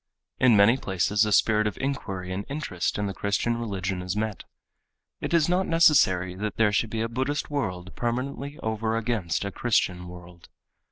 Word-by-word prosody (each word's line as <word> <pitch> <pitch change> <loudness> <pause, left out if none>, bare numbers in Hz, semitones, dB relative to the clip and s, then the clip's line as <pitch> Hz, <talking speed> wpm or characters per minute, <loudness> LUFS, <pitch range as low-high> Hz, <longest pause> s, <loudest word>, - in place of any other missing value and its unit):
In 120 -4 +5
many 105 +5 +6
places 100 -1 +1
a 105 - -1
spirit 105 +1 +3
of 105 - -4
inquiry 95 -9 -3
and 100 +2 -3
interest 140 - -2
in 105 - -1
the 100 - -3
Christian 100 +4 -1
religion 95 -4 -3
is 90 +1 -3
met. 105 -2 -3 0.7
It - - -4
is 165 -3 +3
not 180 +2 +1
necessary 95 - +4
that 105 +1 -3
there 110 -2 +4
should 110 +2 +1
be 110 0 -3
a 115 - 0
Buddhist 130 +6 -2
world 95 -9 -3
permanently 135 +4 -3
over 110 0 -1
against 110 -6 -1
a 100 - -3
Christian 90 -6 0
world. 90 -1 -13
105 Hz, 175 wpm, -26 LUFS, 95-120 Hz, 0.7 s, many